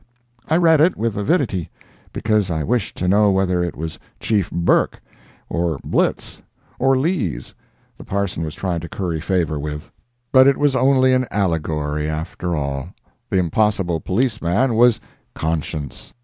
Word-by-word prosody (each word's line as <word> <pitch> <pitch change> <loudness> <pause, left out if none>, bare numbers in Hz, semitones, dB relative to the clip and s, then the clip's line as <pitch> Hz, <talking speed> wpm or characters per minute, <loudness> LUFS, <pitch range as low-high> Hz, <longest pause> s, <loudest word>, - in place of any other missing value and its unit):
I 160 - +3
read 165 -3 +5
it 175 +3 +3
with 115 -1 -1
avidity, 105 - 0 0.4
because 110 -3 0
I 80 -2 -1
wished 115 +4 -1
to 90 - -1
know 105 +2 +4
whether 95 -2 +1
it 85 - -3
was 80 +1 -6 0.2
Chief 105 -5 0
Burke, 85 0 +1 0.5
or 85 -3 -1
Blitz, - - -1 0.4
or 135 0 +3
Lees, 130 - -2 0.5
the - - -9
parson 100 -4 -2
was 75 -1 -5
trying 90 -3 -2
to 85 0 -8
curry 85 -5 -3
favor 85 -4 0
with. 75 0 -6 0.4
But 130 0 +7
it 140 - +4
was 145 -2 +2
only 130 0 +4
an 130 -1 +1
allegory, 75 -5 -1
after 80 +2 -3
all; 70 -2 -3 0.4
the - - +1
impossible 90 -1 +1
police 110 +6 -1
man 115 +10 +1
was 120 +1 +4 0.4
"Conscience." 80 -3 -4
95 Hz, 150 wpm, -20 LUFS, 80-120 Hz, 0.5 s, But